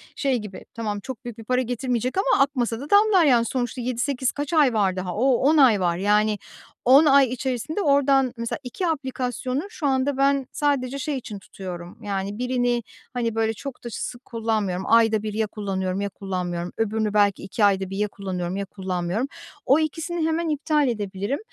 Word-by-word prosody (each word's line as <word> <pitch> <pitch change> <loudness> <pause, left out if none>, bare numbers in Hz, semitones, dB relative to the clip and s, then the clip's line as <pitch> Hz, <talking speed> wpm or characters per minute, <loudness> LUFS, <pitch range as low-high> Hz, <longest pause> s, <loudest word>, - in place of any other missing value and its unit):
şey 270 -3 +1
gibi, 210 -4 -8
tamam, 215 -3 -3
çok 260 +1 -8
büyük 240 -3 -7
bir 225 - -9
para 250 +3 +1
getirmeyecek 250 - -2
ama 390 -7 +4
akmasa 245 -5 -1
da 285 +3 -8
damlar, 405 -4 +5
yani. 240 -5 +4
Sonuçta 245 0 -2
7-8 250 +2 -1
kaç 290 +3 -4
ay 295 -6 +4
var 195 -4 +2
daha? 185 -1 -4
O, 260 +5 +3
10 295 +6 +3
ay 250 -8 +6
var. 175 -2 +1
Yani, 210 +2 +2 0.5
10 270 +5 +7
ay 275 -3 +6
içerisinde 260 - -2
oradan 275 -4 +3
mesela 230 0 -3
2 260 +9 -3
aplikasyonu 260 -3 -2
şu 320 -9 -3
anda 265 +1 +1
ben 275 0 +2
sadece 275 -2 0
şey 285 +1 -2
için 215 -5 -7
tutuyorum. 180 -2 -8
Yani, 200 0 -3
birini, 245 -1 0 0.3
hani, 230 -3 -1
böyle, 225 0 +1
çok 270 +4 -8
da 240 - -5
sık 245 +3 -6
kullanmıyorum. 215 -5 -1
Ayda 225 -2 +4
1 215 -1 -3
ya 220 0 0
kullanıyorum 195 -2 -3
ya 200 - -1
kullanmıyorum. 180 -3 -4
Öbürünü 220 -1 0
belki 205 -2 +3
2 205 +2 +1
ayda 195 -2 +2
1 195 - -5
ya 210 +1 +1
kullanıyorum 185 -3 -4
ya 200 - -2
kullanmıyorum. 185 +4 -2 0.4
O 275 +4 +5
ikisini 320 +1 -1
hemen 325 +1 0
iptal 300 -1 +1
edebilirim. 205 +1 -2
235 Hz, 185 wpm, -24 LUFS, 205-275 Hz, 0.5 s, 10